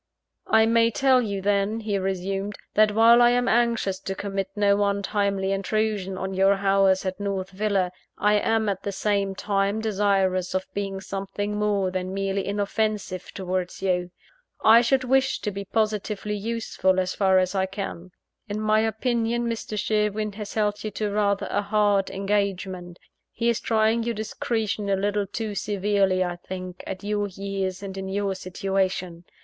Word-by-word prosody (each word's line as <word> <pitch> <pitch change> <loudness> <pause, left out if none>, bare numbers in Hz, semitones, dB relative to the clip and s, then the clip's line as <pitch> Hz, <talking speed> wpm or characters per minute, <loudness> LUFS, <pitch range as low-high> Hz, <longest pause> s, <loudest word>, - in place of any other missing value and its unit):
"I 220 0 +5
may 230 0 +4
tell 260 +2 +3
you 200 -4 -3
then," 205 +2 +1
he 210 -2 -1
resumed, 195 +2 -2 0.2
"that 215 0 +4
while 230 +2 +7
I 240 - +7
am 245 0 +2
anxious 230 -5 +1
to 195 - -4
commit 195 -1 -3
no 205 0 +3
untimely 200 -1 0
intrusion 195 -1 -1
on 190 +1 -3
your 195 +1 +4
hours 195 -1 +3
at 185 +1 -3
North 195 -2 -3
Villa, 195 -2 0 0.3
I 210 0 +3
am 225 0 +1
at 195 -2 -1
the 200 - -3
same 200 -1 0
time 200 +1 0
desirous 195 -4 +1
of 185 0 0
being 195 -1 -3
something 195 +2 -4
more 205 -3 +1
than 185 +1 -3
merely 195 0 -1
inoffensive 205 -2 -2
towards 185 -1 -3
you. 180 -2 0 0.6
I 225 +2 +8
should 260 +2 +2
wish 265 +1 +2
to 210 - -2
be 200 0 -6
positively 210 0 -1
useful, 210 -3 0
as 185 0 -1
far 190 -2 +3
as 185 0 +2
I 190 -1 +1
can. 190 -2 -6 0.4
In 205 +1 -3
my 215 0 +3
opinion 235 +1 0
Mr. 225 -2 -4
Sherwin 210 0 0
has 205 0 -7
held 210 -1 0
you 215 - -2
to 210 -1 -3
rather 200 -1 +1
a - - +1
hard 205 -1 +2
engagement 190 -3 -2 0.3
he 235 - 0
is 235 - +1
trying 220 +1 +2
your 235 0 -2
discretion 215 -1 -2
a 195 - +3
little 205 +1 0
too 215 +1 -4
severely 200 -2 +1
I 175 -1 -3
think, 185 0 -7
at 190 0 -6
your 205 0 -1
years 195 0 -4
and 195 -1 -6
in 190 0 -5
your 200 0 -1
situation. 185 -2 -2
200 Hz, 165 wpm, -25 LUFS, 190-215 Hz, 0.6 s, I